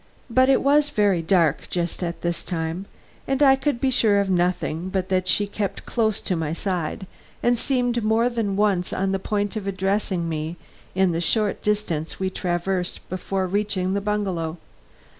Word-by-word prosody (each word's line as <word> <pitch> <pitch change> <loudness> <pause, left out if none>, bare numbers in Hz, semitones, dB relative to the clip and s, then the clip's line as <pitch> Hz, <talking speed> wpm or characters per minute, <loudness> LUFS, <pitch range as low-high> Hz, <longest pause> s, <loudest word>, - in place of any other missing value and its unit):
But 255 +2 +4
it 270 - +4
was 290 +1 +4
very 205 -8 +2
dark 165 -3 +2
just 175 -1 -2
at 170 -2 -3
this 170 0 -1
time 165 +2 -3 0.4
and 270 +2 +2
I 270 -1 +7
could 270 -2 -1
be 265 +1 +1
sure 215 -5 +4
of 195 -1 0
nothing 175 -1 0
but 190 0 -2
that 185 -1 +1
she 205 - +3
kept 200 0 -4
close 220 -3 +1
to 185 - -1
my 160 -2 -2
side 180 0 -3 0.4
and 240 0 +4
seemed 245 -2 0
more 220 +2 +3
than 225 -5 -1
once 195 -3 +1
on 190 0 0
the 195 - 0
point 205 +2 -1
of 205 -2 -4
addressing 190 -2 0
me 160 +1 -3 0.4
in 190 -1 +3
the 165 0 -1
short 210 +3 +1
distance 205 -7 -1
we 190 0 -1
traversed 180 0 -2
before 185 +1 -2
reaching 190 -1 0
the 200 - 0
bungalow. 190 -6 -2
195 Hz, 180 wpm, -23 LUFS, 175-210 Hz, 0.4 s, I